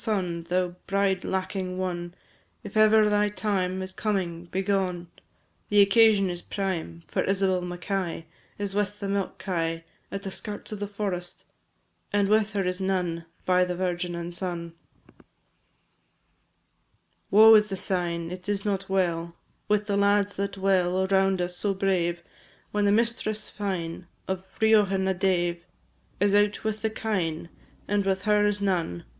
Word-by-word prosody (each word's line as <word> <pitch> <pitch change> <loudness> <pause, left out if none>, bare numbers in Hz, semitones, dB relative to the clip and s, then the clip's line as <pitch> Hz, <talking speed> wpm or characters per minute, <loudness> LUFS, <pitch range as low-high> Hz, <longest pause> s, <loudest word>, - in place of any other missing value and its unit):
Thou 180 -4 -1 0.2
bride 195 -1 +1
lacking 190 -1 -3
one, 175 -1 -3 0.5
If 205 - -9
ever 215 0 +6
thy 210 0 +2
time 190 -3 -1
Is 185 0 -6
coming, 180 -6 -2
begone, 185 -2 -1 0.6
The 205 -1 +6
occasion 200 0 +5
is 175 -1 -4
prime, 170 - -4
For - - -1
Isabel 190 -1 +1
Mackay 175 -1 -3 0.3
Is 200 -1 -3
with 205 0 -1
the 200 - -3
milk 195 -1 -2
kye 165 -3 -2 0.3
At 195 0 -5
the 195 - -5
skirts 205 +2 -7
of 210 - -5
the 205 - -3
forest, 195 -4 -4 0.7
And 200 -1 +2
with 215 0 +3
her 200 -2 0
is 180 +1 -2
none. 180 -3 -1 0.2
By 180 0 +4
the 180 0 -2
Virgin 175 -1 -2
and 170 0 -5
Son, 170 -2 -4 0.3
&c. - - -24 2.2
Woe 220 +2 +8
is 210 -1 +6
the 195 -2 -4
sign! 170 -3 -2
It 180 +2 -7
is 200 0 -1
not 195 -2 -1
well 170 -3 0 0.3
With 210 0 +2
the 200 -1 0
lads 200 0 +2
that 200 0 -2
dwell 190 -1 +2
Around 190 -1 +2
us, 180 0 -3
so 195 +2 -1
brave, 175 -3 0 0.5
When 205 0 +1
the 200 - +4
mistress 215 -1 0
fine 180 -4 -4 0.2
Of 190 0 -3
Riothan 205 -4 +4
a 190 - +2
dave 175 -2 0 0.6
Is 200 +1 +3
out 205 0 +2
with 215 -1 -2
the 220 - +1
kine, 180 -8 -2 0.4
And 205 0 +1
with 190 0 0
her 210 0 +3
is 205 0 -1
none. 175 - -1
190 Hz, 155 wpm, -26 LUFS, 180-205 Hz, 2.2 s, Woe